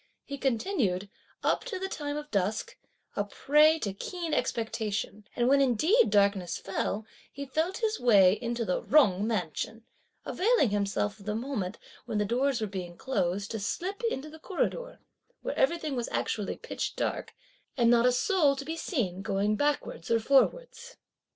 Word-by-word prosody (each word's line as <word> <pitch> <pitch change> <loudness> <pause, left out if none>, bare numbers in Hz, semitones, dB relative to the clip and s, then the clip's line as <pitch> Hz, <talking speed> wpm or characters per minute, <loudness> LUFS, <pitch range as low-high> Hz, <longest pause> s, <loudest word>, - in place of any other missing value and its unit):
He 280 -1 -6
continued, 225 - 0 0.3
up - - +1
to 475 -6 -4
the 380 +1 -3
time 290 -5 -4
of 300 0 -7
dusk, 200 +1 -1 0.4
a 205 - +1
prey 300 +9 +4
to 205 -11 -3
keen 335 - -4
expectation; 220 -2 -2
and, 240 0 +2
when 275 +1 +5
indeed 315 - +4
darkness 200 -4 +2
fell, 200 +2 -3 0.3
he 280 0 -6
felt 320 +8 -1
his 440 0 +1
way 200 -6 +6
into 235 -1 -2
the 180 - 0
Jung 210 -9 +4
mansion, 220 +2 -3 0.4
availing 390 - +2
himself 205 +1 -1
of 200 - -14
the 210 - -1
moment, 225 -5 -3 0.3
when 225 -3 -2
the 210 - +1
doors 250 +3 +1
were - - +1
being 180 -4 -6
closed, 200 -6 -1
to 220 - -3
slip 370 - -3
into 300 -4 -5
the 315 - -12
corridor, - - -2 0.5
where - - -3
everything 335 - +1
was 240 -1 -2
actually 205 -3 -2
pitch - - -4
dark, - - -3 0.4
and 235 -2 +4
not 240 0 +5
a - - +5
soul 290 +2 +3
to 275 0 -6
be 320 +2 -3
seen 220 - -2
going 200 +2 0
backwards 290 - -1
or 230 0 +3
forwards. 475 - +1
240 Hz, 165 wpm, -29 LUFS, 205-305 Hz, 0.5 s, way